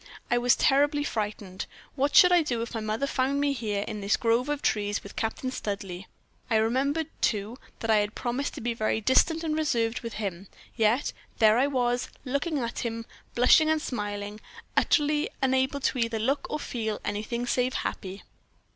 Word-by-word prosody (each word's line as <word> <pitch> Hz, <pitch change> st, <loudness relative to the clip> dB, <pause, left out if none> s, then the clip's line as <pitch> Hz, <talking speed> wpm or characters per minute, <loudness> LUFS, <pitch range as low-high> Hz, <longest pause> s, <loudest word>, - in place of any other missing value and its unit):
I 240 Hz, -, +4 dB
was 245 Hz, 0 st, +4 dB
terribly 290 Hz, +1 st, +3 dB
frightened. 210 Hz, -6 st, -4 dB, 0.3 s
What 280 Hz, +1 st, 0 dB
should 360 Hz, -3 st, +8 dB
I 355 Hz, -1 st, +6 dB
do 240 Hz, -7 st, -1 dB
if 235 Hz, -, -7 dB
my 225 Hz, -, -2 dB
mother 215 Hz, +4 st, -1 dB
found 275 Hz, 0 st, 0 dB
me 285 Hz, 0 st, +2 dB
here 210 Hz, -5 st, -2 dB
in 210 Hz, -, -5 dB
this 200 Hz, +1 st, +2 dB
grove 235 Hz, +4 st, +1 dB
of 295 Hz, -1 st, -2 dB
trees 205 Hz, -1 st, 0 dB
with 200 Hz, -, -11 dB
Captain 230 Hz, +3 st, -2 dB
Studleigh? 195 Hz, -5 st, -5 dB, 0.4 s
I 225 Hz, -, +2 dB
remembered, 265 Hz, +8 st, +1 dB, 0.2 s
too, 215 Hz, +4 st, 0 dB, 0.2 s
that 225 Hz, -, 0 dB
I 215 Hz, -, +5 dB
had 205 Hz, 0 st, 0 dB
promised 255 Hz, +3 st, -2 dB
to -, -, -7 dB
be 235 Hz, +1 st, -1 dB
very 220 Hz, -1 st, 0 dB
distant 315 Hz, +8 st, +3 dB
and 310 Hz, -1 st, -1 dB
reserved 235 Hz, -7 st, 0 dB
with 230 Hz, -2 st, -6 dB
him: 195 Hz, -3 st, -4 dB, 0.3 s
yet 230 Hz, +4 st, +2 dB, 0.2 s
there 220 Hz, +1 st, +5 dB
I 270 Hz, -, +3 dB
was, 245 Hz, -3 st, 0 dB, 0.2 s
looking 280 Hz, +4 st, -1 dB
at 235 Hz, -3 st, -3 dB
him, 230 Hz, -1 st, -3 dB, 0.3 s
blushing 250 Hz, +6 st, +6 dB
and 315 Hz, 0 st, +3 dB
smiling, 205 Hz, -5 st, -4 dB, 0.4 s
utterly 300 Hz, +4 st, +2 dB
unable 265 Hz, +1 st, +1 dB, 0.2 s
either 230 Hz, -2 st, 0 dB
to 220 Hz, -, -2 dB
look 275 Hz, +2 st, 0 dB
or 300 Hz, -, -2 dB
feel 220 Hz, -6 st, -3 dB
anything 215 Hz, +4 st, -2 dB
save 250 Hz, +1 st, 0 dB
happy. 190 Hz, 0 st, -4 dB
240 Hz, 180 wpm, -27 LUFS, 215-280 Hz, 0.4 s, should